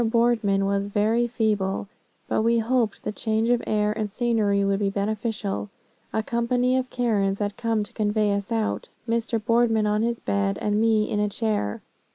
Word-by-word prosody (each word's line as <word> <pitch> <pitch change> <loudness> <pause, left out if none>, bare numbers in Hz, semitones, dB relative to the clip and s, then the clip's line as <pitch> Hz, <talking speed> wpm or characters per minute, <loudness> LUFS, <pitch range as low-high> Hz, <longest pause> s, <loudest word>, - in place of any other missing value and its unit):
Boardman 225 -4 +2
was 200 0 0
very 220 +4 +1
feeble, 210 -5 -1 0.4
but - - +1
we 230 +1 +3
hoped 230 -2 0
the - - -2
change 220 +2 0
of 245 - +2
air 210 0 +1
and 215 -2 -3
scenery 215 -4 +1
would 195 0 +1
be 200 -1 +1
beneficial. 210 0 -2 0.4
A 220 - -1
company 245 +2 +1
of 255 -1 -1
Karens 205 -6 0
had 205 -1 -2
come 225 -2 0
to 205 - -11
convey 210 -1 +1
us 200 +2 -3
out, 225 -2 -1 0.2
Mr. 230 0 0
Boardman 225 -1 +2
on 210 0 +1
his 235 +1 0
bed 100 -1 0
and 210 +1 0
me 220 -1 +3
in 205 - -1
a 210 0 +1
chair. 205 - -2
215 Hz, 180 wpm, -25 LUFS, 205-230 Hz, 0.4 s, we